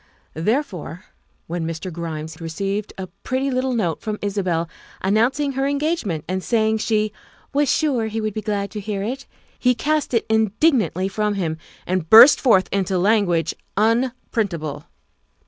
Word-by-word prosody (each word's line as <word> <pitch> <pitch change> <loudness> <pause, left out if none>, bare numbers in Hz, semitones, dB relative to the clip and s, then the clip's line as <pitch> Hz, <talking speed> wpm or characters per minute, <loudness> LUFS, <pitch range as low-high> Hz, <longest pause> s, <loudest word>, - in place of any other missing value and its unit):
Therefore, 185 - -2 0.4
when 170 0 -3
Mr. 165 +2 -5
Grimes 160 -1 -6
received 195 +6 -3
a 190 - -4 0.2
pretty 265 +1 -1
little 255 0 0
note 175 -8 -1
from 215 -1 -3
Isabel 185 -5 -1 0.3
announcing 245 +9 +1
her 270 +1 -1
engagement 285 - -1
and 185 0 -2
say 220 -2 +2
ing 220 0 0
she 215 -1 0 0.2
" - - -31
was 285 -1 +2
sure 265 -7 +1
he 220 +1 -3
would 215 -1 -2
be 215 - -3
glad 205 -1 -2
to 210 - -5
hear 200 -1 -3
it," 260 +6 -4 0.3
he 250 0 +3
cast 300 0 0
it 230 - +1
indignantly 220 - +2
from 210 +1 -1
him 160 -5 -2 0.3
and 180 -3 -2
burst 235 +6 +9
forth 205 -8 +4
into 190 -1 0
language 185 -4 +2 0.2
unprintable. 215 - -1
210 Hz, 155 wpm, -21 LUFS, 180-245 Hz, 0.4 s, burst